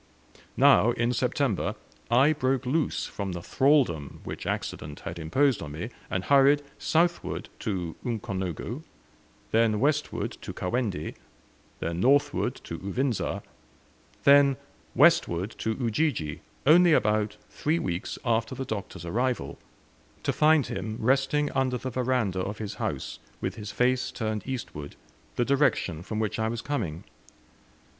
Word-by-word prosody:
Now, 120 +3 +6
in 120 +1 0
September, 125 -4 0 0.3
I 130 +6 +5
broke 135 -2 0
loose 150 +5 0
from 100 -2 -4
the 85 - -5
thraldom 130 - +2
which - - -6
accident 75 0 -4
had 85 +1 -6
imposed 130 - +2
on 75 -2 -6
me, 85 +10 -5 0.2
and 95 - -1
hurried 140 +2 +5 0.2
southward 170 +2 0
to 90 -5 -3
Ukonongo, 100 - -3 0.7
then 110 -2 +3
westward 150 +3 0
to - - -6
Kawendi, 100 -5 -2 0.7
then 85 +1 -2
northward 140 +1 +3
to 85 - -6
Uvinza, 120 +5 -1 0.8
then 140 -1 +6 0.4
westward 90 +6 +4
to 110 0 -1
Ujiji, 115 - -1 0.2
only 170 +3 +7
about 105 -3 +2
three 155 +3 0
weeks 90 - -3
after 115 +2 +1
the 135 - -4
Doctor's 100 -6 -5
arrival, 115 - -1 0.6
to - - +1
find 155 -3 +4
him 110 +3 -4
resting 135 +4 +2
under 130 -1 +1
the 130 +2 -5
veranda 125 -6 0
of 100 +3 -3
his 105 -2 -5
house - - -3 0.2
with - - -2
his 105 -2 -7
face 130 +1 +1
turned 110 -4 -3
eastward, 95 - -5 0.4
the 120 - +1
direction 130 - +1
from 105 +4 -5
which 110 0 -1
I 110 - +1
was 115 0 -4
coming. 95 - -3
120 Hz, 135 wpm, -27 LUFS, 95-135 Hz, 0.8 s, only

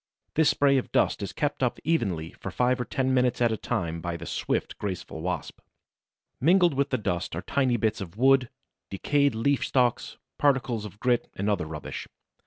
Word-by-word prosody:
This 160 -1 +4
spray 140 -1 +4
of - - -7
dust - - +2
is 100 -3 -4
kept 145 +8 -2
up 125 -2 +1
evenly 95 - 0
for - - -7
five 125 0 +1
or - - -2
ten 130 +2 0
minutes 125 -1 +2
at 120 -2 +3
a - - +1
time 85 -5 -3
by 85 -1 -3
the 85 - -8
swift, - - -2
graceful 95 -5 -5
Wasp. 90 +2 -4 0.8
Mingled 175 +4 +4
with 140 +1 0
this 130 -4 -1
dust 85 -4 -2
are 90 - -4
tiny 130 +2 +1
bits 110 -2 0
of 95 +1 -8
wood, 135 0 +4 0.4
decayed 140 +6 +1
leaf 135 +5 +1
stalks, 125 -3 0 0.2
particles 130 -6 +1
of 105 0 -10
grit 125 -1 +1
and 100 - -2
other 90 -6 -1
rubbish. 75 -2 -6
120 Hz, 190 wpm, -27 LUFS, 95-135 Hz, 0.8 s, This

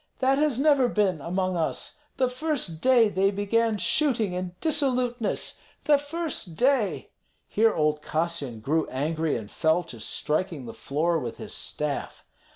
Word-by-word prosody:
That 270 +1 +2
has 295 -5 +2
never 280 -3 +4
been 195 -9 +1
among 185 +3 -1
us! 165 - -3 0.2
The 255 - +3
first 250 - -3
day 250 -3 +5
they 195 -1 +2
began 210 +2 +1
shooting 225 - +1
and 180 0 -5
dissoluteness, 250 -7 +1 0.2
the 295 -2 +4
first 290 - -4
day!" 250 - +1 0.4
Here 225 +1 +2
old 150 -1 +1
Kassyan 155 -8 -2
grew 155 +7 0
angry, 155 +3 -1
and 110 -2 -8
fell 160 +2 +2
to 125 -8 -10
striking 155 - -2
the 115 - -7
floor 165 +4 0
with 120 -5 -5
his - - -7
staff. 150 -2 -4
190 Hz, 150 wpm, -26 LUFS, 160-255 Hz, 0.4 s, day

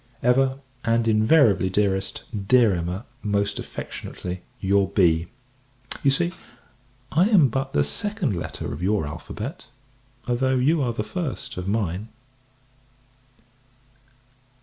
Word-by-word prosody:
Ever, 130 +2 +3 0.3
and 115 0 +2
invariably, 110 -3 +4
dearest, 95 0 0 0.2
dear 120 -4 +5
Emma, 90 +5 -3 0.2
most 100 -1 0
affectionately, 90 0 -6 0.2
your 100 0 +2
B. 85 -4 +3 0.7
You 140 - +4
see, 170 +6 +2 0.8
I 175 +8 +4
am 175 - +6
but 135 +3 -2
the 70 - +3
second 170 - -1
letter 80 -5 -4
of 75 - -7
your 100 -2 +1
alphabet, 105 - -7 0.6
though 130 +2 +1
you 145 +5 +3
are 125 -3 +1
the 110 -2 -3
first 165 +3 -4
of 90 0 -5
mine. 100 -1 -1
110 Hz, 115 wpm, -24 LUFS, 95-135 Hz, 0.8 s, am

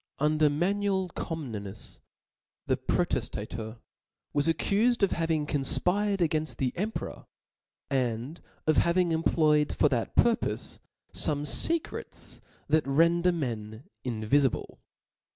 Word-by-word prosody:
Under 150 +1 +3
Manuel 190 +4 0
Comnenus, 110 - -6 0.7
the - - +2
Protejtatcr - - -1
{})^Nicetas, 110 +1 -6 0.6
Was 145 +1 +2
accufed 215 +7 +2
of 200 - +4
having 160 -2 0
confpired 180 +8 +1
againft 155 0 -2
the 130 -2 0
erti 205 - -2
nuercomt - - -35
peror, - - -6 0.7
and 125 +3 -1 0.2
of 155 - +3
having 170 0 +3
employed 155 -2 +3
for 150 - +4
that 120 -4 -2
purpofe"^""^, 235 -1 +1 0.3
fome 145 -2 0
fecrets 330 - 0 0.3
that 155 -1 +2
render 170 +5 +4
men 115 -8 -4 0.2
invifible. 125 +3 0
155 Hz, 115 wpm, -28 LUFS, 135-180 Hz, 0.7 s, of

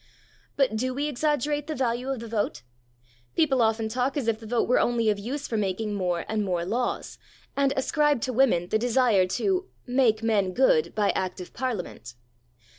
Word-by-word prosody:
But 265 -5 +2
do 255 +3 -1
we 290 +2 -1
exaggerate 295 +1 0
the 310 - -3
value 250 0 -1
of 265 -4 -2
the 230 - -7
vote? 205 - -2 0.7
People 275 -6 +3
often 220 0 +1
talk 250 +5 -1
as 265 -5 -2
if 220 -1 +1
the 225 - -10
vote 235 +1 +1
were 250 - +3
only 230 -2 +2
of 205 - -3
use 270 +8 -4
for 225 - -2
making 210 +1 -1
more 180 -4 -1
and 220 -1 -1
more 175 -3 -1
laws, 240 +6 -2 0.4
and 275 -1 +2
ascribe 295 +1 +2
to 255 - -2
women 220 -9 +3
the 220 - +2
desire 235 -5 +3
to 380 - 0 0.2
"make 245 -4 +2
men 205 -5 +1
good 180 -9 +3
by 210 -2 +2
Act 185 0 -3
of 180 - -9
Parliament." 195 - -4
235 Hz, 190 wpm, -26 LUFS, 210-265 Hz, 0.7 s, People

